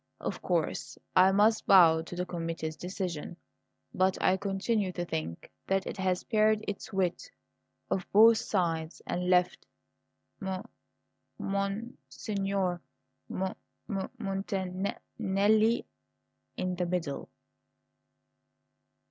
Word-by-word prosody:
Of - - -4
course - - -1 0.2
I 185 +1 +7
must 215 +3 +3
bow 165 -4 +7
to 165 +2 -8
the 180 +1 -2
committee's 165 -3 -4
decision, 175 -2 -4 0.6
but 185 0 +2
I 185 - +4
continue 200 +1 0
to 175 -1 -3
think 80 - -5 0.2
that 195 0 +1
it - - -4
has 185 -1 0
pared 215 -1 +2
its 205 +2 -5
wit 190 - -1 0.6
o' 190 - +1
both 225 +2 +7
sides 165 -6 -1
and 180 +1 -2
left 180 -1 +2 0.7
M 190 -1 -3 0.7
mon 200 +4 -2
signor 195 -4 -1 0.5
M 190 - -2 0.4
m 195 -4 -3
montan 195 -2 -3
n - - -4 0.2
nelli 215 +3 +3 0.7
in 185 0 -1
the 180 -1 0
middle." 170 -5 -3
190 Hz, 115 wpm, -30 LUFS, 180-200 Hz, 0.7 s, I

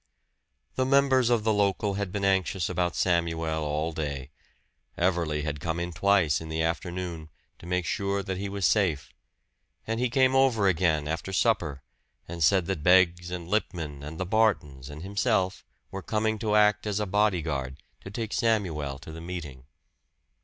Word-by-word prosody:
The 130 - +2
members 135 -3 +4
of 120 -3 +2
the 110 0 +2
local 100 0 +1
had 100 -2 -3
been 100 0 -2
anxious 95 -2 +1
about 90 -1 -1
Samuel 80 -3 0
all 75 +2 -1
day. 70 -3 -4 0.7
Everley 85 -4 0
had 75 -1 -3
come 85 +2 -2
in 85 0 -4
twice 95 -4 +2
in 80 - -8
the 80 0 -1
afternoon, 85 -1 -3 0.3
to 85 - -11
make 90 0 -1
sure 100 +2 -1
that 95 -1 -4
he 100 0 -3
was 100 -2 -2
safe; 90 -7 +1 0.7
and 115 +1 -2
he 125 0 +1
came 130 +1 +3
over 130 -6 +3
again 80 -5 +1
after 80 +4 -3
supper, 85 - 0 0.4
and 85 -1 -3
said 95 +2 +4
that 95 -4 -3
Beggs 90 0 +4
and 90 -2 -5
Lippman 85 -8 -2
and 75 +3 -8
the 95 - -1
Bartons 85 - 0
and 75 +2 -9
himself 100 -1 0 0.3
were 95 - -5
coming 110 +2 -1
to 110 -2 0
act 105 0 +3
as 105 0 -1
a 105 - 0
body 105 -3 +1
guard 70 -4 -3 0.3
to - - -8
take 110 +1 -4
Samuel 85 - 0
to 75 - -11
the 80 +1 -8
meeting. 80 -7 -7
90 Hz, 175 wpm, -27 LUFS, 80-105 Hz, 0.7 s, members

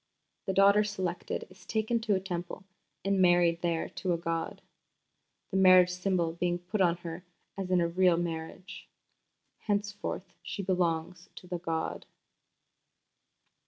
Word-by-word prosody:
The 190 - 0
daughter 200 +2 +6
selected 190 -4 -3
is 185 0 -17
taken 220 +4 0
to 220 -3 +1
a - - +1
Temple 180 -1 -5 0.4
and 195 -1 +2
married 175 -1 +4
there 170 -2 0
to 185 -3 -2
a - - 0
god, 165 -1 -3 0.9
the 190 - 0
marriage 185 -1 +7
symbol 180 -2 0
being 175 +1 0
put 180 +4 -3
on 175 -2 +3
her 165 +1 -6 0.3
as 195 -2 -4
in 185 -1 +3
a 170 - +2
real 180 0 +3
marriage. 170 +2 -5 0.7
Henceforth 205 -2 -3
she 200 - -5
belongs 180 -1 -1
to - - -11
the 180 -1 -4
god. 165 -1 -3
180 Hz, 140 wpm, -30 LUFS, 170-195 Hz, 0.9 s, marriage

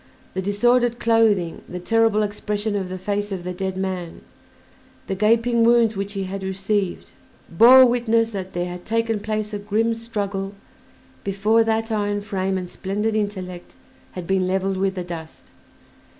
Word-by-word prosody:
The 190 - -2
disordered 240 +5 +2
clothing, 220 -7 +2
the 180 - -5
terrible 225 +2 +2
expression 205 0 -2
of 190 -2 -2
the 185 - -5
face 205 +2 -2
of 185 -3 -4
the 180 0 -4
dead 190 0 -3
man, 185 -3 -4 0.8
the - - -3
gaping 230 +4 +3
wounds 230 -1 +4
which 200 +1 -4
he 195 -1 -2
had 190 +1 -5
received, 195 0 -2 0.4
bore 250 +9 +8
witness 230 -2 +2
that 190 -2 -6
there 175 0 -1
had 180 0 -7
taken 225 -1 0
place 215 0 -3
a 205 - -2
grim 215 +3 0
struggle 205 -4 -4 0.7
before 210 +3 +2
that 225 0 0
iron 205 -1 0
frame 195 -2 -2
and 180 -1 -4
splendid 205 +5 -2
intellect 185 -4 -4 0.4
had 180 -2 -6
been 190 0 +1
leveled 190 +1 0
with 195 0 0
the 180 - -3
dust. 165 -2 -9
205 Hz, 160 wpm, -22 LUFS, 190-225 Hz, 0.8 s, bore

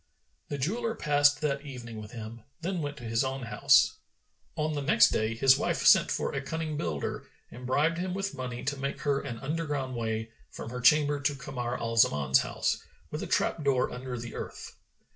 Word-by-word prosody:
The 145 - -3
jeweller 225 - -1
passed 145 -4 +3
that 140 -2 0
evening 120 -6 -8
with 105 - -9
him, 115 0 -8 0.2
then 180 0 -2
went 145 0 -4
to 125 - -10
his 115 +2 +1
own 135 0 -3
house. 115 - +4 0.6
On 155 0 -1
the 145 - -2
next 135 -4 +5
day, 110 +1 0
his 135 +3 +5
wife - - -1
sent - - +7
for - - -1
a 135 - -2
cunning 160 +1 -3
builder 80 - -3 0.2
and 125 +1 -8
bribed 155 +6 +2
him 185 0 -2
with 195 0 -2
money 125 -2 -5
to 140 +1 -2
make 140 +1 -4
her 140 -1 +1
an 125 -5 -6
underground 145 -3 -2
way[FN#423] 110 -1 -2 0.2
from - - -8
her 125 0 -5
chamber 145 +2 +4
to 140 0 0
Kamar 125 -2 -4
al 115 0 -3
Zaman's 70 -10 +4
house, - - -1 0.3
with - - -4
a - - -4
trap 160 - 0
door 135 -3 +2
under 125 0 -5
the 120 0 -7
earth. - - -7
135 Hz, 200 wpm, -29 LUFS, 120-150 Hz, 0.6 s, sent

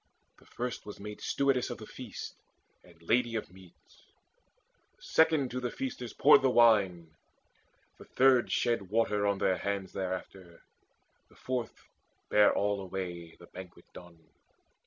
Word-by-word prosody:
The - - -22
first 125 -2 -5
was 105 - -10
made 105 +1 -8
Stewardess 135 -3 0
of - - -5
the - - -10
feast - - -8 0.5
and 85 -2 -20
lady 120 +5 +1
of 110 - -4
meats; 90 -5 -19 1.0
The - - -22
second 160 -5 +2
to 125 - -3
the 125 -1 -3
feasters 125 -1 -5
poured 145 - +6
the 135 - +3
wine; 100 -9 +3 0.9
The - - -12
third 130 -2 +3
shed 115 -6 0
water 105 -1 +1
on 100 -1 +1
their 95 -1 +1
hands 100 -2 -3
thereafter; 95 -2 -6 0.7
The - - -22
fourth 125 -3 -5 0.5
bare 105 0 +5
all 100 -1 0
away, 90 -3 -6
the 85 - -14
banquet 90 0 -12
done. 85 -2 -13
105 Hz, 145 wpm, -30 LUFS, 90-125 Hz, 1.0 s, poured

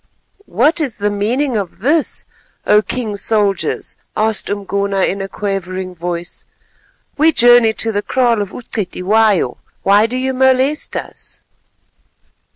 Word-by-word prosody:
"What 320 +2 +2
is 265 -7 -2
the 205 0 0
meaning 240 +6 -1
of 200 -4 -3
this, 295 +8 0 0.4
O 210 - +5
King's 215 -3 -4
soldiers?" 205 -3 0 0.2
asked 220 0 0
Umgona 200 -1 -1
in 195 +1 0
a 195 - -4
quavering 190 -2 -4
voice. 175 0 -5 0.8
"We 320 +2 +5
journey 240 -4 +5
to 225 +1 -2
the 205 -1 -1
kraal 240 -2 +1
of 200 - -3
U'Cetywayo; 205 - 0 0.3
why 205 +3 +4
do 250 +2 -4
you 260 +1 -1
molest 265 +3 +1
us?" - - -9
215 Hz, 130 wpm, -16 LUFS, 195-250 Hz, 0.8 s, O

